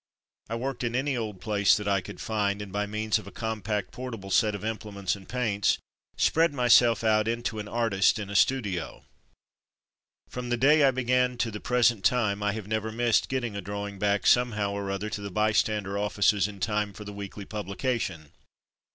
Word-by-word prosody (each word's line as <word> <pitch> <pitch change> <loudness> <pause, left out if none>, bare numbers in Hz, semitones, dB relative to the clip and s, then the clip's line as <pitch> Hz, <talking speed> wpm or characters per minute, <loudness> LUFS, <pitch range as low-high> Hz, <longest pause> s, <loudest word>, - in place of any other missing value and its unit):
I 115 - -2
worked 125 +1 -3
in 120 0 -1
any 135 +1 0
old 110 -5 -4
place 100 0 +3
that 105 -1 -5
I 100 -1 +2
could - - -10
find, 105 -2 -1
and 105 -2 -7
by 105 0 -1
means 110 +1 0
of - - -12
a - - -9
compact 110 -2 -3
portable 115 -6 -7
set 105 0 +3
of 100 - -7
imple 110 -1 -4
ments 100 -1 -2
and 95 -2 -14
paints, 110 -5 +1 0.4
spread 165 -2 +3
myself 120 -2 +5
out 110 -1 +3
into 115 -1 -2
an 105 - -5
artist 110 -4 +2
in 105 -2 -5
a 100 - -7
''studio/' 100 -6 0 1.2
From 125 -1 -6
the 120 - +1
day 145 +5 +5
I - - +6
began 125 -1 +1
to 115 -1 -1
the 105 - -6
present 120 -4 +2
time 105 -2 +2
I 105 0 0
have 110 -2 -6
never 110 0 -2
missed 115 0 +1
getting 120 -5 -2
a 100 - -3
drawing 100 +1 -5
back 100 0 +1
somehow 110 -5 +3
or 100 -1 -4
other 100 +2 -3
to 105 - -4
the 100 - -5
Bystander 105 0 +1
offices 105 -1 +2
in 100 -2 -10
time 105 +1 -1
for 105 - -9
the 105 - -7
weekly 100 0 -7
publication. 100 - -3
105 Hz, 195 wpm, -27 LUFS, 100-120 Hz, 1.2 s, I